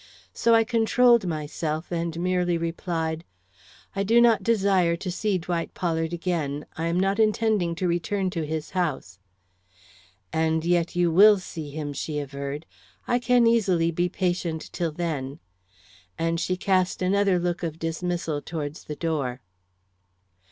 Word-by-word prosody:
So 230 0 +3
I 225 - +5
controlled 235 -1 +3
myself 155 0 -3
and 170 -1 -2
merely 180 -1 +1
replied: 165 -1 -3 0.7
"I 195 - 0
do 225 +4 +4
not 235 -3 +5
desire 195 -6 +2
to 180 +2 -5
see 200 +2 0
Dwight 170 -1 -3
Pollard 165 -2 -1
again. 165 -5 -2
I 165 +1 -2
am 170 +2 +1
not 195 +2 +1
intending 215 -5 +2
to 180 +2 -1
return 180 +3 -1
to 165 -3 -2
his 155 0 -4
house." 150 - -2 1.1
"And 160 0 +1
yet 175 -1 +1
you 175 -1 +2
will 205 +5 +7
see 160 -5 -7
him," 145 0 -5
she 150 +2 -4
averred. 140 +1 -5 0.4
"I 245 - +2
can 245 0 +3
easily 190 -8 +3
be 175 +2 0
patient 175 -3 -2
till 170 -2 -1
then." 150 -4 -3 0.8
And 165 0 0
she 185 +2 -1
cast 185 -1 +1
another 195 0 +3
look 175 0 -1
of 165 -2 -3
dismissal 165 -2 -2
towards 150 -2 -6
the 150 - -5
door. 145 -7 -2
170 Hz, 145 wpm, -25 LUFS, 160-190 Hz, 1.1 s, will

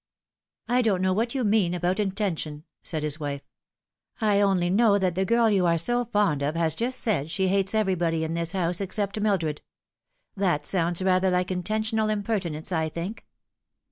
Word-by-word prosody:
" - - -53
I - - +4
don't 200 -6 +1
know 185 0 +2
what 230 +6 -1
you 260 - 0
mean 205 -5 +2
about 180 +3 -1
intention," 185 -7 -2 0.2
said 155 -3 -4
his 150 0 0
wife; 145 -2 -4 0.4
" - - -67 0.3
I 210 -3 +2
only 185 -3 +2
know 205 0 +4
that 185 -3 0
the 190 +2 0
girl 230 +2 +3
you 195 -5 +2
are 170 0 +3
so 240 +8 +1
fond 205 -10 +1
of 145 +3 -1
has 165 -2 +1
just 250 +8 -2
eaid 180 -10 0
she 190 +2 0
hates 195 +2 +1
everybody 175 -6 +1
in 160 +1 -3
this 170 +1 0
house 180 -1 -1
except 200 +1 -2
Mildred. 170 -8 0 0.7
That 180 -7 0
sounds 175 0 0
rather 185 0 +3
like 180 0 0
intentional 215 +4 -1
impertinence, 195 -7 -2
I 160 -2 0
think." 170 +7 -6
185 Hz, 185 wpm, -26 LUFS, 170-210 Hz, 0.7 s, I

